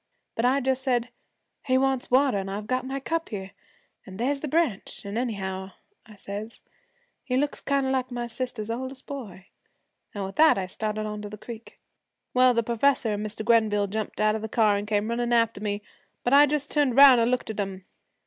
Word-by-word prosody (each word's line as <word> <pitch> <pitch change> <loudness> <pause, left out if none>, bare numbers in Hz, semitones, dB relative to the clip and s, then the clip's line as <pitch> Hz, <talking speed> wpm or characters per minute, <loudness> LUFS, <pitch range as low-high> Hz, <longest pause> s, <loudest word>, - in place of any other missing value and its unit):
But 225 - -1
I 265 +3 +3
just 265 0 0
said, 250 -2 0 0.6
"He 255 0 +3
wants 265 -1 0
water, 260 -4 +3
an' 195 0 -5
I've 205 +2 -4
got 255 +3 -1
my 270 +1 -3
cup 330 +4 -2
here, 195 -3 -6 0.6
an' 190 -1 -9
there's 275 +5 0
the 305 - -3
branch, 295 - -1
an' 200 +1 -5
anyhow," 190 -5 -3 0.3
I 215 - -14
says, 205 +3 -7 0.6
"he 255 -2 -1
looks 285 +1 -1
kind 280 -1 0
of 265 - 0
like 260 -1 0
my 240 -1 -4
sister's 235 -2 -4
oldest 260 +3 -5
boy," 220 -10 -8 0.7
an' 200 - -3
with 195 +1 -7
that 315 -5 +6
I 190 - -1
started 215 +3 -3
on 210 0 -5
to 205 - -7
the 210 - -9
creek. 230 +1 -10 0.6
'Well, 255 -1 +5
the 230 - +2
professor 235 +1 +1
an' 210 0 -2
Mr. 215 0 -5
Grenville 220 -3 +3
jumped 210 +1 -4
out 215 0 +3
of 220 - -3
the 220 - -5
car 215 -2 +3
an' 200 +1 -3
came 210 0 0
runnin' 240 +1 -1
after 230 -3 +2
me, 205 -1 -3 0.4
but 245 - +1
I 290 +1 +8
just 290 0 -1
turned 285 -5 +2
'round 270 -4 +9
an' 230 - +2
looked 250 -3 -1
at 215 - -7
'em. 195 -2 -4
230 Hz, 210 wpm, -26 LUFS, 210-260 Hz, 0.7 s, round